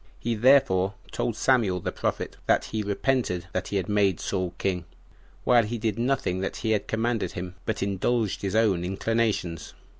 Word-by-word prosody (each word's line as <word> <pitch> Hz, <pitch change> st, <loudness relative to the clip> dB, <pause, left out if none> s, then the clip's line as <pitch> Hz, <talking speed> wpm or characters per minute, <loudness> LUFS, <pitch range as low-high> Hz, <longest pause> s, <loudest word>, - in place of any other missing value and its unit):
He 120 Hz, -, -2 dB
therefore 110 Hz, -6 st, +4 dB, 0.2 s
told 115 Hz, -, -1 dB
Samuel 110 Hz, -6 st, +2 dB
the -, -, -3 dB
prophet, -, -, -3 dB
that -, -, +3 dB
he 110 Hz, -, -3 dB
repented 105 Hz, -3 st, 0 dB
that 95 Hz, -, -2 dB
he -, -, -4 dB
had 95 Hz, -, -2 dB
made 100 Hz, -4 st, +2 dB
Saul 90 Hz, -2 st, -2 dB
king, 90 Hz, -3 st, -1 dB, 0.6 s
while 120 Hz, -1 st, +5 dB
he 115 Hz, +2 st, -3 dB
did 110 Hz, -1 st, -2 dB
nothing 120 Hz, -7 st, 0 dB
that 95 Hz, -, -3 dB
he 110 Hz, -, -1 dB
had 105 Hz, -, 0 dB
commanded 115 Hz, 0 st, -1 dB
him, 90 Hz, 0 st, -5 dB
but 105 Hz, -3 st, -1 dB
indulged 100 Hz, +2 st, 0 dB
his 100 Hz, +1 st, -2 dB
own 105 Hz, -6 st, +3 dB
inclinations. 95 Hz, -3 st, -1 dB
105 Hz, 175 wpm, -26 LUFS, 95-115 Hz, 0.6 s, while